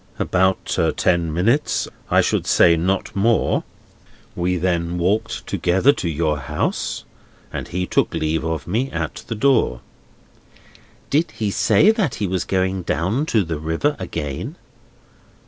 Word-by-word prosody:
"About 95 Hz, +1 st, +1 dB, 0.2 s
ten 85 Hz, -3 st, +1 dB
minutes; 115 Hz, -, +1 dB, 0.2 s
I -, -, +5 dB
should -, -, 0 dB
say 85 Hz, -1 st, +5 dB
not 95 Hz, +5 st, -1 dB
more. 110 Hz, +3 st, +2 dB, 0.7 s
We 90 Hz, +1 st, 0 dB
then 85 Hz, -1 st, -1 dB
walked 105 Hz, +6 st, -1 dB
together 95 Hz, +11 st, +2 dB
to 90 Hz, -, -3 dB
your 75 Hz, -1 st, 0 dB
house, 65 Hz, -, -2 dB, 0.5 s
and -, -, -4 dB
he 90 Hz, +1 st, -2 dB
took -, -, +1 dB
leave 80 Hz, +1 st, -1 dB
of 80 Hz, -2 st, -3 dB
me 115 Hz, +9 st, -1 dB
at -, -, -4 dB
the 115 Hz, -, -3 dB
door." 115 Hz, -, +2 dB, 1.3 s
"Did 155 Hz, +4 st, +2 dB
he 105 Hz, -2 st, -3 dB
say 210 Hz, -, +4 dB
that 210 Hz, -, -1 dB
he 105 Hz, -, -2 dB
was 90 Hz, -1 st, -1 dB
going 95 Hz, 0 st, 0 dB
down 100 Hz, -, -1 dB
to 110 Hz, -8 st, +2 dB
the 80 Hz, -3 st, -4 dB
river 80 Hz, -, 0 dB
again?" 75 Hz, -6 st, -4 dB
90 Hz, 140 wpm, -21 LUFS, 85-110 Hz, 1.3 s, I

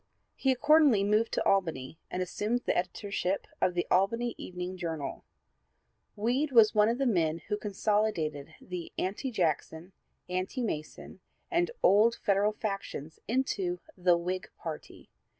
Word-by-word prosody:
He 265 Hz, -, +1 dB
accordingly 290 Hz, -5 st, +5 dB
moved 215 Hz, +3 st, +2 dB
to -, -, 0 dB
Albany 165 Hz, -7 st, 0 dB
and 185 Hz, -, -2 dB
assumed 210 Hz, +7 st, -1 dB
the -, -, +1 dB
editorship 190 Hz, +1 st, -2 dB, 0.2 s
of 180 Hz, -, +2 dB
the 175 Hz, -, 0 dB
Albany 230 Hz, +6 st, +2 dB
Evening 180 Hz, 0 st, -6 dB
Journal. 165 Hz, -5 st, -5 dB, 0.9 s
Weed 250 Hz, +8 st, 0 dB
was 225 Hz, -4 st, +6 dB
one 210 Hz, 0 st, +4 dB
of 235 Hz, -, 0 dB
the 275 Hz, -, 0 dB
men 165 Hz, -9 st, +2 dB
who 210 Hz, -, +1 dB
consolidated 195 Hz, -8 st, -1 dB
the 180 Hz, -2 st, -7 dB
Anti 200 Hz, +8 st, -2 dB
Jackson, 170 Hz, -, -2 dB, 0.3 s
Anti 185 Hz, +8 st, -2 dB
Mason 155 Hz, -9 st, -5 dB, 0.3 s
and 350 Hz, 0 st, +2 dB
old 220 Hz, +4 st, +5 dB
Federal 205 Hz, 0 st, +1 dB
factions 195 Hz, -8 st, -5 dB
into 200 Hz, -8 st, 0 dB, 0.2 s
the 180 Hz, -2 st, +3 dB
Whig 180 Hz, +2 st, -3 dB
party. 160 Hz, -2 st, -8 dB
195 Hz, 135 wpm, -30 LUFS, 175-225 Hz, 0.9 s, was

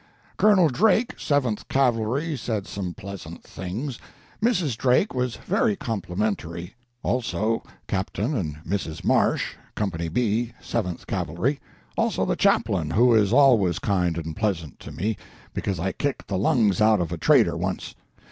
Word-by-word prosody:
Colonel 205 Hz, -5 st, +5 dB
Drake, 220 Hz, -, +2 dB
Seventh 130 Hz, -7 st, 0 dB
Cavalry, 135 Hz, +4 st, +1 dB
said 110 Hz, -6 st, -3 dB
some 95 Hz, -3 st, -5 dB
pleasant 100 Hz, 0 st, -8 dB
things; 115 Hz, +9 st, -5 dB, 0.4 s
Mrs. 180 Hz, -, +1 dB
Drake 125 Hz, -, +2 dB
was 125 Hz, -2 st, -1 dB
very 215 Hz, +2 st, +1 dB
complimentary; 100 Hz, -, -3 dB, 0.3 s
also 115 Hz, -2 st, 0 dB, 0.3 s
Captain 105 Hz, +7 st, -1 dB
and 80 Hz, -, -2 dB
Mrs. 90 Hz, -5 st, -3 dB
Marsh, -, -, +2 dB, 0.2 s
Company 85 Hz, -5 st, -2 dB
B, 115 Hz, +4 st, 0 dB
Seventh 90 Hz, -7 st, -3 dB
Cavalry; 95 Hz, -, -1 dB, 0.4 s
also -, -, +1 dB
the -, -, 0 dB
Chaplain, 85 Hz, -6 st, +2 dB
who 120 Hz, +7 st, +4 dB
is 105 Hz, -3 st, +4 dB
always 120 Hz, -, +5 dB
kind 90 Hz, -4 st, 0 dB
and 80 Hz, -1 st, -4 dB
pleasant 95 Hz, -10 st, -2 dB
to -, -, -9 dB
me, 105 Hz, +2 st, -2 dB, 0.4 s
because 95 Hz, -4 st, -2 dB
I 95 Hz, +3 st, 0 dB
kicked 145 Hz, +7 st, -3 dB
the 100 Hz, -, 0 dB
lungs 105 Hz, -2 st, +3 dB
out 110 Hz, -1 st, +5 dB
of 85 Hz, -2 st, -2 dB
a 85 Hz, -, -2 dB
trader -, -, +4 dB
once. -, -, -3 dB
110 Hz, 140 wpm, -25 LUFS, 90-130 Hz, 0.4 s, Colonel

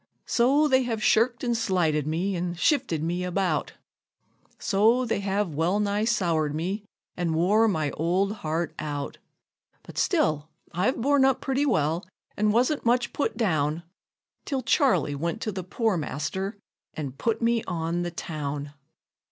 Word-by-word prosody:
So 275 Hz, +5 st, +3 dB
they 260 Hz, -2 st, +4 dB
have 230 Hz, -4 st, -2 dB
shirked 235 Hz, +2 st, +3 dB
and 240 Hz, -1 st, +1 dB
slighted 170 Hz, -9 st, +1 dB
me, 180 Hz, +5 st, -1 dB
an' 175 Hz, 0 st, -2 dB
shifted 175 Hz, -, +1 dB
me 175 Hz, +2 st, -1 dB
about 180 Hz, +1 st, -1 dB, 0.8 s
So 225 Hz, +5 st, +3 dB
they 230 Hz, -, -1 dB
have 200 Hz, -3 st, -1 dB
well 170 Hz, +7 st, +1 dB
nigh 205 Hz, +1 st, 0 dB
soured 170 Hz, -9 st, +1 dB
me, 190 Hz, +6 st, -2 dB, 0.3 s
an' 170 Hz, -3 st, -1 dB
wore 205 Hz, +7 st, +4 dB
my 155 Hz, -8 st, 0 dB
old 190 Hz, +6 st, 0 dB
heart 160 Hz, -1 st, -2 dB
out; 145 Hz, -2 st, -4 dB, 0.6 s
But -, -, -7 dB
still 160 Hz, -, +1 dB, 0.2 s
I've 185 Hz, +9 st, 0 dB
borne 280 Hz, +3 st, +3 dB
up 265 Hz, -1 st, +3 dB
pretty 275 Hz, +2 st, 0 dB
well, 160 Hz, -, +1 dB, 0.3 s
an' 210 Hz, 0 st, +2 dB
wasn't 250 Hz, +7 st, +2 dB
much 240 Hz, +1 st, +1 dB
put 285 Hz, -6 st, -1 dB
down, 160 Hz, -7 st, 0 dB, 0.6 s
Till 270 Hz, -3 st, -2 dB
Charley 225 Hz, -, +2 dB
went 170 Hz, +8 st, -2 dB
to 215 Hz, -, -2 dB
the 190 Hz, -2 st, -5 dB
poor 215 Hz, +2 st, 0 dB
master, 180 Hz, +7 st, -3 dB, 0.4 s
an' 145 Hz, -4 st, -4 dB
put 220 Hz, -, -1 dB
me 230 Hz, -1 st, +1 dB
on 170 Hz, 0 st, -2 dB
the 175 Hz, -, -2 dB
town. 145 Hz, -4 st, -5 dB
190 Hz, 150 wpm, -26 LUFS, 160-230 Hz, 0.8 s, they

